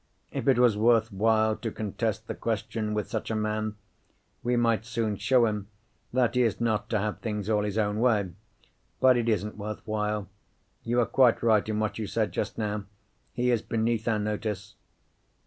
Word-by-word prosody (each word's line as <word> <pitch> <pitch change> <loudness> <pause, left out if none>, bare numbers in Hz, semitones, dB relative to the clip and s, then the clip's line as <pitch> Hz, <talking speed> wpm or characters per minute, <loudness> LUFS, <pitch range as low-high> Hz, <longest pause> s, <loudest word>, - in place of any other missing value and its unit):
If - - -4
it 135 -3 +5
was 120 -3 +5
worth 110 +1 +3
while 110 +2 +2
to 115 - -4
contest 105 -2 -3
the - - -4
question 105 -1 -2
with 105 - -1
such 110 - -4
a 110 - -1
man, 110 0 -1 0.7
we 120 0 0
might 115 -2 +2
soon 115 -2 -1
show 125 +3 +3
him 105 -2 -2 0.4
that 125 -1 +2
he 125 - +3
is 115 -4 +1
not 110 -3 0
to 110 - +1
have 105 +1 -2
things 105 -2 -3
all 105 -1 +3
his 105 0 -2
own 105 -1 +1
way. 110 -6 +2 0.7
But 130 -1 +6
it 120 -1 +1
isn't 105 -1 -1
worth 105 0 -6
while. 105 -2 -1 0.5
You 120 +1 -1
were 120 - +4
quite 125 -2 +3
right 110 -2 +3
in 105 0 -1
what 110 0 -2
you 110 - -3
said 110 0 0
just - - -3
now; 105 -2 -2 0.5
he 125 0 +1
is 120 -3 +2
beneath 115 0 -1
our 110 -2 +2
notice." 105 -1 -3
110 Hz, 190 wpm, -28 LUFS, 105-115 Hz, 0.7 s, But